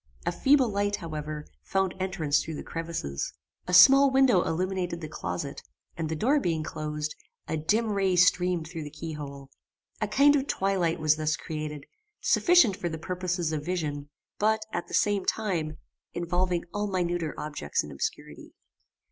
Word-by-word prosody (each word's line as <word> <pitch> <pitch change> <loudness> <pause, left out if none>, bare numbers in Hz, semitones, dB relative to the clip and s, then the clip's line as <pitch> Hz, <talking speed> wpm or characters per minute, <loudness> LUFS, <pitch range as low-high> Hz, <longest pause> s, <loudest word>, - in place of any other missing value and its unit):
A - - +1
feeble 270 -3 +4
light, 205 0 0
however, 155 -3 -6 0.2
found 190 -1 0
entrance 175 -6 +1
through 160 - -6
the - - -6
crevices. 165 - -4 0.3
A 180 - -3
small 275 +8 +9
window 265 -8 +4
illuminated 180 0 -2
the 155 - -6
closet, 145 -1 -5 0.3
and 160 -1 -3
the 160 - -1
door 265 - +2
being 165 - -1
closed, 150 0 -4 0.3
a - - -1
dim 215 +9 +1
ray 195 -2 +1
streamed 180 -2 +3
through 165 -1 -6
the 150 - -7
key 155 +2 -7
hole. 140 -2 -8 0.5
A 215 - +1
kind 280 +7 +5
of 275 -1 0
twilight 190 -4 0
was 155 -1 +3
thus 155 -1 0
created, 150 -2 -5 0.3
sufficient 345 - +4
for 180 -3 -3
the 160 - -4
purposes 180 -1 -2
of 155 -2 -2
vision; 150 -5 -3 0.3
but, 220 +1 +2
at - - -3
the - - -3
same 205 -2 +2
time, 170 -9 -1 0.4
involving 175 0 -1
all 205 0 -1
minuter 175 -4 -1
objects 145 - -2
in - - -9
obscurity. 70 - -5
175 Hz, 165 wpm, -28 LUFS, 155-195 Hz, 0.5 s, small